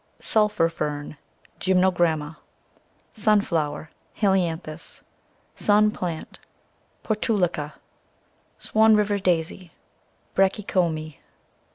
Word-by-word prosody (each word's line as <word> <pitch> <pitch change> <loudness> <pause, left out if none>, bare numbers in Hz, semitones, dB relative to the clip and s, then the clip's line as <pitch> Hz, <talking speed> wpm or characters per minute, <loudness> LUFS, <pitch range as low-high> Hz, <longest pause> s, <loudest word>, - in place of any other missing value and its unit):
Sulphur 210 -6 +2
Fern, 150 -2 -4 0.4
CC 190 0 +1
Gytnnogramma. 170 -4 +1 0.8
Sunflower, 165 -9 +1 0.2
CI - - -22
Helianthus. 175 -5 -1 0.5
Sun 210 0 +3
Plant, 170 -5 -5 0.3
<( - - -40
Portulaca, 185 -9 -1 0.8
Swan 220 0 +4
River 205 -1 +1
Daisy, 170 -3 0
C( - - -27 0.6
Br - - +2
achy 195 +2 +2
come. 160 -5 -1
180 Hz, 90 wpm, -24 LUFS, 160-210 Hz, 0.8 s, Swan